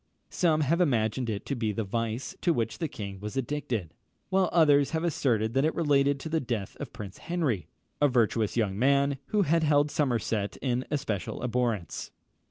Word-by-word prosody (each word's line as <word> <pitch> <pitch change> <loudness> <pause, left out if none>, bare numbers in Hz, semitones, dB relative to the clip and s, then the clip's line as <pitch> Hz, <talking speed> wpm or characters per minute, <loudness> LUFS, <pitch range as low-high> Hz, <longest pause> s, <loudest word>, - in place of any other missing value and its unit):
Some 160 -3 +2
have 165 +5 +2
imagined 120 -5 +1
it 105 -2 -3
to 140 - -2
be 115 -3 -1
the 110 +2 -2
vice 115 +4 -3
to 170 - +3
which 115 -5 -2
the 165 - -1
king 100 -7 -7
was 105 +5 -6
addicted; 120 - -2 0.4
while 190 -1 +2
others 145 -4 +5
have 160 - -2
asserted 115 -9 +1
that 135 +1 +2
it 155 - +1
related 140 -3 +2
to - - -5
the 160 0 +1
death 115 -8 -3
of - - -6
Prince 100 -1 -8
Henry, 140 - -1 0.3
a 145 - +6
virtuous 115 -4 +1
young 100 -3 0
man, 140 +1 +3
who 210 -1 +2
had 165 0 +2
held 145 -1 +3
Somerset 115 -8 0
in 125 -1 -1
especial 135 -11 -3
abhorrence. 120 -6 -1
130 Hz, 180 wpm, -28 LUFS, 110-150 Hz, 0.4 s, a